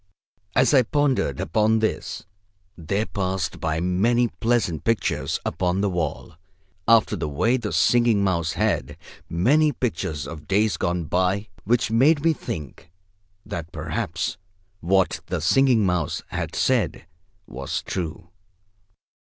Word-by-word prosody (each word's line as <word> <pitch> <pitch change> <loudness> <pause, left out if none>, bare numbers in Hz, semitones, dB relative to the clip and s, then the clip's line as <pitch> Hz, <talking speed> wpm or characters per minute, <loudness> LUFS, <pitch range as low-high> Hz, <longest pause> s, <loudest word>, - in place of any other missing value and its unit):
As 130 - +4
I 135 - +7
pondered 130 - 0
upon 110 +6 +2
this, 110 0 -2 0.5
there 100 +6 -2
passed 95 -5 -3
by 80 -1 -1
many 110 +8 +2
pleasant 105 - 0
pictures 115 -1 0
upon 90 +1 0
the 100 -1 +1
wall, 85 -1 -3 0.5
after 115 -2 +5
the 75 -5 -3
way 115 - +1
the 115 -5 -3
Singing 120 -4 +3
Mouse 85 -4 0
had; 75 +3 -1 0.3
many 145 - +3
pictures 90 - -3
of 80 -2 -9
days 105 +2 +2
gone 85 0 -1
by, 95 +5 0 0.2
which 115 +1 +1
made 140 +6 +4
me 165 - +5
think 80 - -7 0.5
that 85 -1 -6
perhaps - - -3 0.4
what 95 +1 +1
the 90 -1 -2
Singing 120 - +3
Mouse 90 -4 -1
had - - -4
said - - +1 0.4
was 65 -2 -4
true. 85 -1 -5
95 Hz, 125 wpm, -24 LUFS, 85-115 Hz, 0.5 s, I